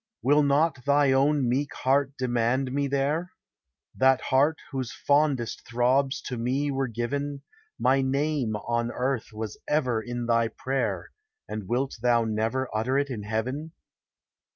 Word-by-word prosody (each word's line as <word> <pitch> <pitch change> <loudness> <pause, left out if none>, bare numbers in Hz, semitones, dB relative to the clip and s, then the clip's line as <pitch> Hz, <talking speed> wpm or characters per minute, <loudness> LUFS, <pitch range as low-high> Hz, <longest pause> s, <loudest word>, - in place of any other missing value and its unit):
Will 145 +3 +5
not 145 -1 +2
thy 145 -1 +4
own 140 0 +3
meek 135 +4 -1
heart 135 +1 +1
demand 125 +1 0
me 140 +1 0
there? 145 +6 -1 0.6
That 130 0 +4
heart 145 +4 +2
whose 130 -4 -3
fondest 140 -5 0
throbs 130 +4 +1
to 125 - -4
me 135 +5 0
were 135 -1 -1
given; 140 +5 -3 0.3
My 135 +1 +3
name 135 -3 0
on 120 +2 -1
earth 125 -2 -2
was 110 0 -6
ever 130 -7 +1
in 120 +1 -4
thy 115 -1 +2
prayer, 135 +4 -3 0.4
And 105 -3 -5
wilt 130 +3 -1
thou 120 -1 +3
never 110 +4 -1
utter 125 +5 +1
it 140 -1 0
in 115 -4 -4
heaven? 130 +9 -3
130 Hz, 145 wpm, -26 LUFS, 120-140 Hz, 0.6 s, Will